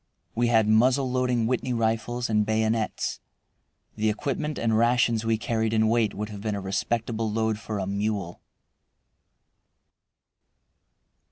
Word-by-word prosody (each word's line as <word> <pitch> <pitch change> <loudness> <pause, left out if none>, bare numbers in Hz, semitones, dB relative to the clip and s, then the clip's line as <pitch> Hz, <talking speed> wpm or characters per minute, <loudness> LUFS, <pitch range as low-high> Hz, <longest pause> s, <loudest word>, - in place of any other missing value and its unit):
We 120 +1 +1
had 110 -2 +3
muzzle 125 +4 +3
loading 125 -2 +1
Whitney 125 +1 -1
rifles 115 +1 -1
and 105 -1 +2
bayonets. 110 +1 -1 0.8
The 110 0 +1
equipment 140 +7 -2
and 115 -1 +1
rations 115 -1 +2
we 115 0 +2
carried 110 0 -1
in 110 0 +3
weight 115 -3 +1
would 105 +1 -4
have 105 -2 -8
been 105 -1 -2
a - - -3
respectable 110 +3 -2
load 110 0 0
for 110 -1 -5
a 100 - -2
mule. 100 -2 -3
110 Hz, 135 wpm, -26 LUFS, 110-120 Hz, 0.8 s, had